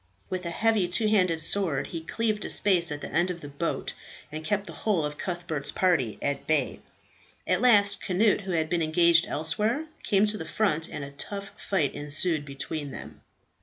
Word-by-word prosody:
With 185 Hz, -1 st, -3 dB
a -, -, -1 dB
heavy 215 Hz, +1 st, +2 dB
two 185 Hz, +5 st, +2 dB
handed 180 Hz, -6 st, +2 dB
sword 165 Hz, -4 st, +1 dB
he 165 Hz, -, -6 dB
cleaved 215 Hz, +5 st, -1 dB
a -, -, -5 dB
space 180 Hz, -5 st, +3 dB
at 145 Hz, 0 st, -4 dB
the -, -, -6 dB
end 175 Hz, +3 st, +2 dB
of 175 Hz, -2 st, -5 dB
the 145 Hz, -, -7 dB
boat, 145 Hz, +4 st, -3 dB, 0.4 s
and 155 Hz, +1 st, -6 dB
kept 200 Hz, +5 st, 0 dB
the -, -, -9 dB
whole 190 Hz, -8 st, 0 dB
of 150 Hz, 0 st, -5 dB
Cuthbert's 170 Hz, -6 st, -3 dB
party 160 Hz, -, +1 dB
at 140 Hz, -1 st, -2 dB
bay. 155 Hz, -, +1 dB, 0.7 s
At -, -, +1 dB
last 205 Hz, -5 st, +4 dB
Cnut, 205 Hz, +3 st, +2 dB
who 195 Hz, -1 st, -5 dB
had 160 Hz, -1 st, +1 dB
been 170 Hz, +1 st, 0 dB
engaged 165 Hz, +1 st, +4 dB
elsewhere, 210 Hz, -, 0 dB, 0.2 s
came 200 Hz, +1 st, +3 dB
to 210 Hz, 0 st, -1 dB
the -, -, -5 dB
front, 165 Hz, -7 st, 0 dB
and 150 Hz, -, -6 dB
a 140 Hz, -, -7 dB
tough 200 Hz, +7 st, -6 dB
fight 165 Hz, -9 st, -1 dB
ensued 150 Hz, +1 st, 0 dB
between 145 Hz, +1 st, -5 dB
them. -, -, -10 dB
175 Hz, 195 wpm, -27 LUFS, 155-200 Hz, 0.7 s, last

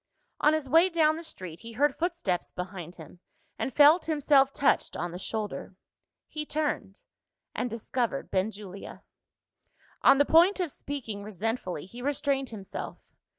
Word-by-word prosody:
On 300 Hz, -, +4 dB
his 310 Hz, -3 st, -3 dB
way 330 Hz, +7 st, +5 dB
down 315 Hz, -3 st, +3 dB
the 330 Hz, -, -7 dB
street, 185 Hz, -, -8 dB
he 230 Hz, 0 st, -9 dB
heard 290 Hz, +5 st, +2 dB
footsteps 335 Hz, -, -2 dB
behind 180 Hz, -2 st, -7 dB
him, 165 Hz, +1 st, -13 dB, 0.4 s
and -, -, -1 dB
felt 300 Hz, +5 st, +6 dB
himself 285 Hz, -3 st, +4 dB
touched 280 Hz, -, +1 dB
on 175 Hz, +1 st, -3 dB
the 175 Hz, -, -7 dB
shoulder. 210 Hz, -2 st, -5 dB, 0.5 s
He 305 Hz, -, -4 dB
turned 295 Hz, -10 st, -3 dB, 0.5 s
and 245 Hz, -, -2 dB
discovered 235 Hz, +1 st, -2 dB
Benjulia. 200 Hz, 0 st, -4 dB, 1.0 s
On 275 Hz, -, +7 dB
the 285 Hz, -, +4 dB
point 350 Hz, +7 st, +5 dB
of 350 Hz, -5 st, -1 dB
speaking 235 Hz, -10 st, -5 dB
resentfully, 205 Hz, -4 st, -3 dB
he 235 Hz, +6 st, -10 dB
restrained 275 Hz, -1 st, 0 dB
himself. 200 Hz, -4 st, -8 dB
250 Hz, 145 wpm, -28 LUFS, 195-300 Hz, 1.0 s, On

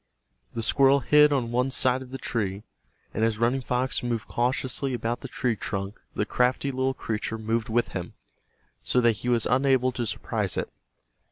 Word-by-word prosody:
The 115 Hz, -, -2 dB
squirrel 135 Hz, +3 st, +5 dB
hid 150 Hz, +4 st, +5 dB
on 125 Hz, -5 st, 0 dB
one 125 Hz, +2 st, +1 dB
side 130 Hz, -1 st, +2 dB
of 130 Hz, -, -10 dB
the 135 Hz, -, -5 dB
tree, 105 Hz, -5 st, -3 dB, 0.5 s
and 110 Hz, -, -1 dB
as 110 Hz, -1 st, +1 dB
Running 120 Hz, +4 st, +1 dB
Fox 125 Hz, +3 st, -1 dB
moved 120 Hz, -2 st, -2 dB
cautiously 130 Hz, +2 st, -1 dB
about 120 Hz, +1 st, -2 dB
the -, -, -7 dB
tree 125 Hz, -4 st, -1 dB
trunk 100 Hz, -1 st, -5 dB
the 105 Hz, -, 0 dB
crafty 125 Hz, +4 st, +1 dB
little 130 Hz, 0 st, -1 dB
creature 110 Hz, -3 st, -3 dB
moved 110 Hz, +1 st, -2 dB
with 120 Hz, +2 st, +1 dB
him, 90 Hz, -2 st, -6 dB, 0.7 s
so 125 Hz, -, +1 dB
that 120 Hz, -3 st, +3 dB
he 120 Hz, -, -3 dB
was 120 Hz, -2 st, +2 dB
unable 130 Hz, 0 st, +3 dB
to 120 Hz, -2 st, -3 dB
surprise -, -, -2 dB
it. -, -, -3 dB
125 Hz, 180 wpm, -26 LUFS, 115-130 Hz, 0.7 s, squirrel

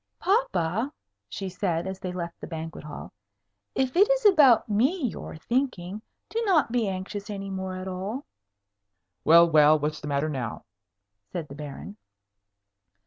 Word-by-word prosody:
"Papa," 225 Hz, -, +1 dB, 0.4 s
she 195 Hz, -, -5 dB
said, 180 Hz, -2 st, -1 dB
as 190 Hz, 0 st, -5 dB
they 185 Hz, -, -4 dB
left 170 Hz, -1 st, -6 dB
the -, -, -6 dB
banquet 160 Hz, -1 st, -6 dB
hall, 150 Hz, -1 st, -9 dB, 0.6 s
"if 260 Hz, -1 st, 0 dB
it 400 Hz, +5 st, +6 dB
is -, -, +2 dB
about 290 Hz, -, +6 dB
me 260 Hz, -, +1 dB
you're 210 Hz, -, -7 dB
thinking, 215 Hz, -, -2 dB, 0.3 s
do 455 Hz, -, -2 dB
not 340 Hz, -, +3 dB
be 235 Hz, -3 st, +1 dB
anxious 195 Hz, +2 st, -5 dB
any 195 Hz, -1 st, -5 dB
more 190 Hz, -1 st, -4 dB
at 185 Hz, 0 st, -6 dB
all." 195 Hz, +9 st, -4 dB, 1.0 s
"Well, 170 Hz, +2 st, +7 dB
well; 155 Hz, -1 st, +6 dB
what's 150 Hz, +1 st, -3 dB
the 150 Hz, -, -6 dB
matter 140 Hz, +1 st, 0 dB
now?" 130 Hz, -7 st, -4 dB, 0.7 s
said 165 Hz, -4 st, -5 dB
the -, -, -8 dB
Baron. 150 Hz, +8 st, -8 dB
190 Hz, 150 wpm, -26 LUFS, 165-245 Hz, 1.0 s, Well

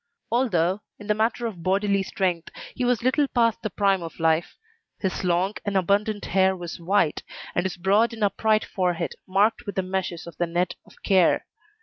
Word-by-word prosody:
Although, 200 Hz, -6 st, +1 dB, 0.2 s
in 205 Hz, -, -11 dB
the 210 Hz, -, +2 dB
matter 225 Hz, +2 st, 0 dB
of 205 Hz, -7 st, -5 dB
bodily 195 Hz, +2 st, +1 dB
strength, 185 Hz, -3 st, -1 dB, 0.2 s
he 255 Hz, -, -3 dB
was 245 Hz, -2 st, +1 dB
little 280 Hz, +3 st, +3 dB
past 230 Hz, -4 st, +1 dB
the 215 Hz, -, -2 dB
prime 195 Hz, -1 st, +1 dB
of 165 Hz, 0 st, -8 dB
life, 160 Hz, +1 st, +1 dB, 0.4 s
his 190 Hz, -1 st, -2 dB
long 180 Hz, +3 st, +1 dB
and 200 Hz, -1 st, 0 dB
abundant 205 Hz, +3 st, +1 dB
hair 190 Hz, 0 st, +3 dB
was 175 Hz, -1 st, -7 dB
white, 170 Hz, -2 st, +1 dB, 0.3 s
and 175 Hz, -, 0 dB
his 185 Hz, -, -7 dB
broad 200 Hz, +6 st, +3 dB
and 225 Hz, -2 st, -4 dB
upright 215 Hz, +2 st, +2 dB
forehead 180 Hz, -3 st, -1 dB
marked 205 Hz, +4 st, +2 dB
with 200 Hz, -, -4 dB
the 190 Hz, -, 0 dB
meshes 185 Hz, -2 st, -3 dB
of 170 Hz, -, -11 dB
the 175 Hz, -, 0 dB
net 175 Hz, +1 st, 0 dB
of -, -, -18 dB
care. 185 Hz, -4 st, +3 dB
195 Hz, 190 wpm, -25 LUFS, 175-215 Hz, 0.4 s, little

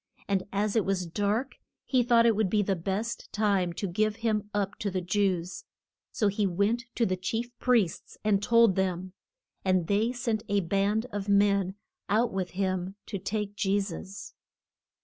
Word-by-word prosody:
And 195 Hz, -2 st, +1 dB
as 205 Hz, +2 st, 0 dB
it 220 Hz, -, +3 dB
was 190 Hz, -2 st, -1 dB
dark 205 Hz, +9 st, -1 dB, 0.3 s
he 255 Hz, -2 st, +3 dB
thought 235 Hz, -1 st, +4 dB
it 230 Hz, -2 st, +4 dB
would 210 Hz, -2 st, +1 dB
be 210 Hz, +1 st, +2 dB
the 195 Hz, 0 st, 0 dB
best 195 Hz, +6 st, -3 dB
time 200 Hz, -4 st, +1 dB
to 195 Hz, -, -3 dB
give 215 Hz, +4 st, 0 dB
him 215 Hz, -2 st, -1 dB
up 205 Hz, -1 st, -2 dB
to 205 Hz, -, -1 dB
the 185 Hz, -1 st, -1 dB
Jews. 180 Hz, -1 st, -1 dB, 0.5 s
So 210 Hz, -, +1 dB
he 200 Hz, 0 st, +1 dB
went 205 Hz, +6 st, 0 dB
to 235 Hz, -, +2 dB
the 185 Hz, -, 0 dB
chief 225 Hz, +6 st, -3 dB
priests 230 Hz, -9 st, +1 dB
and 205 Hz, -2 st, +2 dB
told 230 Hz, -3 st, +5 dB
them, 185 Hz, -1 st, -1 dB, 0.5 s
and 185 Hz, -2 st, +2 dB
they 205 Hz, +6 st, +1 dB
sent 235 Hz, -3 st, -1 dB
a 200 Hz, 0 st, +2 dB
band 200 Hz, +5 st, +1 dB
of 205 Hz, 0 st, -4 dB
men 200 Hz, -2 st, +3 dB, 0.3 s
out 220 Hz, +3 st, +2 dB
with 185 Hz, -2 st, -2 dB
him 185 Hz, -1 st, -1 dB
to 200 Hz, -, -5 dB
take 205 Hz, +1 st, -3 dB
Je 200 Hz, 0 st, +1 dB
sus. 195 Hz, 0 st, -6 dB
200 Hz, 175 wpm, -28 LUFS, 190-215 Hz, 0.5 s, told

